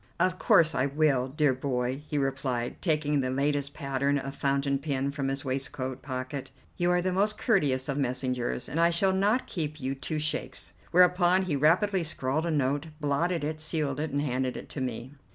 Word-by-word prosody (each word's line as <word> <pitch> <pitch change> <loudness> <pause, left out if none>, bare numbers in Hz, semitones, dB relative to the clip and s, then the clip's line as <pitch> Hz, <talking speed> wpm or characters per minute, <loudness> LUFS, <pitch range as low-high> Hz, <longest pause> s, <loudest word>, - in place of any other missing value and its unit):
"Of 185 0 +1
course 160 -1 +5
I 130 +1 +1
will, 140 -3 +2
dear 145 0 +2
boy," 130 0 -2
he 150 - -2
replied, 135 -3 -2
taking 150 -4 +1
the 130 - -1
latest 140 +1 -1
pattern 140 +1 0
of 135 0 -4
fountain 140 0 0
pen 140 -1 -1
from 140 -1 -3
his 135 +1 -2
waistcoat 130 -1 -3
pocket; 130 0 -5 0.3
"you 175 -1 +1
are 180 0 +2
the 185 0 0
most 210 +3 +2
courteous 145 - +1
of 140 0 -1
messengers, 125 -2 -2
and 155 - -3
I 170 0 +5
shall 190 +3 +2
not 205 +6 +2
keep 155 -3 -4
you 135 -1 -2
two 145 +3 -4
shakes." 150 0 -2 0.2
Whereupon 180 +1 +4
he 175 -6 -1
rapidly 180 +6 +3
scrawled 155 0 -1
a - - 0
note, 145 +1 0
blotted 160 +3 0
it, 155 +1 -3
sealed 150 -3 0
it, 155 +1 -1
and 145 +1 -1
handed 130 -2 -1
it - - -9
to 140 - -5
me. 130 +1 -4
145 Hz, 190 wpm, -28 LUFS, 135-160 Hz, 0.3 s, course